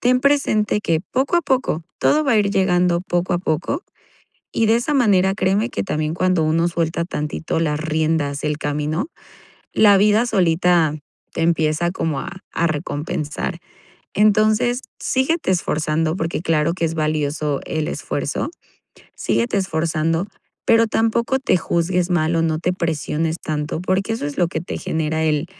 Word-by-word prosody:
ten 250 +1 +3
presente 255 -7 +2
que, 165 -5 0
poco 275 +6 +1
a 345 - +2
poco, 260 - 0 0.2
todo 305 +1 +3
va 270 - +2
a 220 - +4
ir 200 -1 +2
llegando 180 -3 +2
poco 175 0 -1
a - - +1
poco 160 - -2 0.7
y 225 - +1
de 225 - +4
esa 240 +6 0
manera, 195 -7 +3
créeme 200 +4 +1
que - - -3
también 155 -3 -2
cuando 185 -1 +1
uno 165 +2 +2
suelta 170 0 -1
tantito 150 0 -3
las 150 -2 0
riendas 155 -2 0
del 150 -1 -1
camino, 150 - -2 0.7
la 205 -2 +6
vida 210 +3 +4
solita 175 -6 +2 0.4
te - - -3
empieza 165 0 +1
como 160 -6 -2
a - - -5 0.2
a 170 - +1
recompensar. 150 +2 -3 0.5
Entonces, 215 +4 +3 0.2
síguete 270 - 0
esforzando, 160 -2 0
porque 165 -1 -2
claro 165 -1 +1
que 170 -2 -1
es 160 - -2
valioso 150 -2 -1
el 155 -1 -2
esfuerzo, - - -3 0.7
síguete 115 - 0
esforzando, 165 -1 0 0.4
pero 230 0 +5
tampoco 230 +4 +1
te 225 - +2
juzgues 175 +1 0
mal 165 -1 +1
o 165 - +2
no 160 -1 0
te 180 +2 0
presiones 160 -1 -1
tanto, 155 +1 -3
porque 190 +4 0
eso 225 - -3
es 145 - -6
lo 175 -2 +3
que 160 - -3
te 170 - -5
genera 160 0 -1
el 155 +1 +1
170 Hz, 160 wpm, -20 LUFS, 155-205 Hz, 0.7 s, la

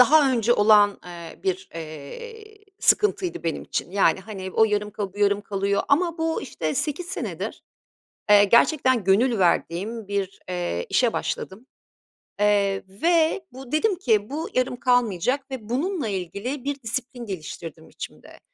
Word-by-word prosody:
daha 280 +1 +6
önce 235 -1 +3
olan, 205 -2 +5
eee, 170 -2 -10
bir, 190 0 -2
eee, 420 - -9 0.2
sıkıntıydı 395 -4 +2
benim 165 - -2
için. - - -4
Yani, 195 0 +3
hani, 190 -2 -7
o 220 - +4
yarım 210 -1 0
kalıyor, 205 -2 -4
bu - - -11
yarım 205 0 +3
kalıyor 200 -1 -1
ama 335 +3 +2
bu, 325 0 -1
işte, 160 - -3
8 300 +4 -2
senedir, 380 +2 -5 0.7
eee, 205 0 +8
gerçekten 255 +1 +4
gönül 220 +5 +3
verdiğim 195 +4 0
bir, 200 -1 -3
eee, 175 - -2
işe 240 -3 +2
başladım, 210 +7 -4 0.7
eee, 200 -1 +2
ve 325 - +1
bu, 260 0 -11
dedim 385 +7 +2
ki, 215 - +2
"Bu 305 +4 -4
yarım 255 0 +1
kalmayacak." 250 +2 +1
ve 230 -5 -7
bununla 300 - -1
ilgili 200 - -4
bir 280 0 -3
disiplin 240 +1 -4
geliştirdim 165 -4 -7
içimde. - - -10
220 Hz, 145 wpm, -24 LUFS, 195-275 Hz, 0.7 s, eee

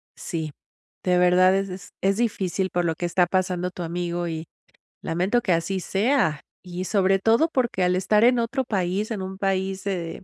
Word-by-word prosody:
Sí, 160 -4 -4 0.5
de 180 -1 +2
verdad 180 +1 +5
es 195 0 -1 0.3
e - - +1
es 195 - 0
difícil 195 -5 -1
por 175 0 0
lo 165 -1 0
que 175 - -3
está 175 +1 +2
pasando 180 -1 -1
tu 180 - -8
amigo 175 +1 -3
y, 160 0 -4 0.6
lamento 185 +9 0
que 185 - +1
así 175 +3 -1
sea. 195 - +1 0.2
Y 180 0 -5
sobre 195 -1 +2
todo 225 +10 +3
porque, 240 -8 0
al 180 0 +2
estar 210 +4 +2
en 245 +1 +5
otro 245 +3 -1
país, 195 +1 -1
en 210 -4 -3
un 190 0 -6
país 190 -1 -1
de 175 -3 -4
185 Hz, 190 wpm, -24 LUFS, 175-200 Hz, 0.6 s, verdad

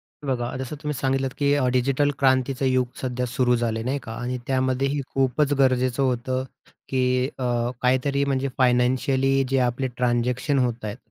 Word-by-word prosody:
हे 145 - -15
बघा 120 -2 -2
जसं 130 +3 -5
तुम्ही 150 0 -1
सांगितलत, 135 0 0
की 140 -1 +2
अ, 130 -3 +1
डिजिटल 135 +3 +2
क्रांतीचं 130 0 +2
युग 130 -1 +2
सध्या 125 -1 -2
सुरू 125 0 +1
झालं 115 -1 -1
आहे, 115 - -5
नाही 140 +2 -1
का? 115 - -8
आणि 125 +1 -2
त्यामध्येही 130 +2 0
खूपच 135 +2 +1
गरजेचं 130 0 +2
होतं 130 0 -1 0.5
की 130 0 +1
अ, 135 - -8 0.4
काहीतरी 130 +2 +2
म्हणजे 135 0 0
फायनान्शियली 130 +2 +2
जे 135 - +1
आपले 125 +1 0
ट्रान्झॅक्शन 125 +3 +1
होत 120 -3 -1
आहेत. 105 +3 -5
130 Hz, 165 wpm, -24 LUFS, 125-135 Hz, 0.5 s, की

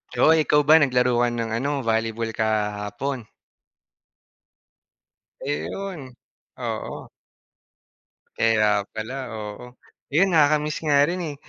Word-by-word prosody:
Oh, 125 - +4
ikaw 155 -2 +4
ba 155 +2 +6
naglaro 125 -4 +2
ka 120 0 +3
ng 115 -1 -3
ano, 140 +4 -1
volleyball 115 -1 -1
kahapon? 110 +3 -2 2.2
Ayun, 145 -1 -5 0.4
oo. - - -5 1.3
Kaya 110 -2 +2
pala, 125 +4 -6
oo, 110 +3 -8 0.3
'yun 175 +5 +3
nakaka-miss 150 0 +2
nga 145 -2 +4
rin, 180 +1 -2
eh, 150 -3 -5
125 Hz, 100 wpm, -23 LUFS, 110-150 Hz, 2.2 s, ba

